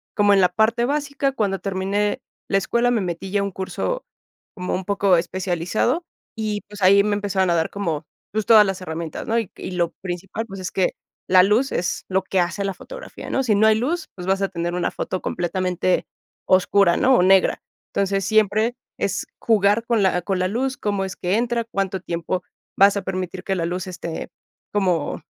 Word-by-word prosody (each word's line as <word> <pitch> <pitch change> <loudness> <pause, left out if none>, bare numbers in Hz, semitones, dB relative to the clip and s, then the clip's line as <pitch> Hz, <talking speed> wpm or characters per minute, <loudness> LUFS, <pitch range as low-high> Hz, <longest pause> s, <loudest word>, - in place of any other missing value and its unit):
como 205 -1 +4
en 195 - +5
la 180 - +5
parte 220 +5 +2
básica. 280 0 -1
Cuando 200 -6 -1
terminé 200 +4 -1 0.3
la 195 - +3
escuela, 235 +5 +1
me 240 - +2
metí 180 +1 -4
ya 205 - +2
a - - 0
un 200 - -2
curso 345 - -3 0.5
como 180 -1 -3
un 190 - -3
poco 200 -1 +3
especializado 185 - -1 0.3
y, 215 -2 -2
pues, 205 -1 -10
ahí 200 +2 +6
me 210 0 +1
empezaron 195 -2 0
a - - +3
dar 160 -1 +1
como, 165 -6 -3 0.3
pues, 215 -1 -1
todas 215 -2 +7
las 195 -1 -3
herramientas, 160 -2 -5
¿no? 230 +1 +2
Y 225 - -4
y - - -6
lo 175 -2 0
principal, 190 +4 -4
pues, 195 -2 -8
es 185 - -4
que 185 -2 +1 0.4
la 185 0 +7
luz 220 +8 +2
es 175 - -1
lo 190 0 +2
que 190 0 0
hace 195 +3 -2
la 195 - -1
fotografía, - - -9
¿no? 270 - +1
Si 225 -5 +2
no 210 +2 +4
hay 220 - +5
luz, 310 +10 -2
pues, 180 -1 -7
vas 195 +1 +1
a 195 - +1
tener 175 -1 -3
una 180 - 0
foto 185 - -4
completamente 180 0 0 0.4
oscura, 185 -1 +4
¿no? 260 +1 +4
O - - +4
negra. 190 0 +4 0.3
Entonces, 195 -1 0
siempre 215 +2 +2 0.2
es 200 - -1
jugar 210 0 +3
con 235 -3 +2
la 180 -2 +2
con 190 0 -1
la 185 - +1
luz, 260 +5 -1
cómo 200 -2 -1
es 190 - -6
que 180 +2 -1
entra, 235 0 0
cuánto 195 -4 -2
tiempo 175 +1 -3 0.3
vas 200 +1 +6
a - - -1
permitir 185 0 -4
que 195 - -1
la 170 -3 -1
luz 180 +2 -3
esté 170 -3 -6 0.4
como 180 -7 0
195 Hz, 205 wpm, -22 LUFS, 185-215 Hz, 0.5 s, todas